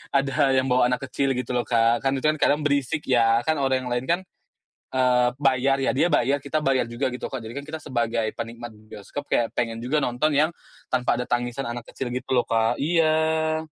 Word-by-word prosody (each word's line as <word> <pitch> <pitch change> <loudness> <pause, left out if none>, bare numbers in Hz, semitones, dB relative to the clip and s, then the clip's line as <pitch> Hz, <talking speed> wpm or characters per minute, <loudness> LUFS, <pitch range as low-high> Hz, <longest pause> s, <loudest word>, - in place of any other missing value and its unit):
ada 135 -1 +1 0.2
yang 130 0 +2
bawa 125 -1 +4
anak 125 +2 -1
kecil 135 -1 0
gitu 125 - -3
loh, 120 - +1
Kak. 115 +1 +2
Kan 135 0 +2
itu - - -6
kan 155 - +3
kadang 145 +1 +3
berisik 145 +1 0
ya. 115 -2 +4
Kan 160 -2 +1
orang 130 -1 +1
yang 125 - -5
lain 120 +1 -2
kan, 175 +2 +3 0.8
eee, 125 -1 +3
bayar 135 0 +2
ya, - - +2
dia 165 - +3
bayar, 135 +4 +3
kita 155 +3 -2
bayar 135 -2 +2
juga 120 +3 -2
gitu 125 - -5
kok. 130 - -3
Jadi 110 +2 -8
kan 140 - -7
kita 160 0 -6
sebagai 115 -3 -1
penikmat 115 +1 -6 0.2
bioskop 145 +8 -7
kayak 115 - +1
pengen 115 -1 -1
juga 135 +6 0
nonton 135 +4 0
yang, 155 +3 +3 0.4
tanpa 125 -1 +1
ada 125 - -2
tangisan 120 +2 -1
anak 120 0 -6
kecil 130 - -5
gitu 125 - -5
loh, 120 - +3
Kak 115 +1 +1
iya. 160 0 +1
130 Hz, 215 wpm, -24 LUFS, 120-145 Hz, 0.8 s, bawa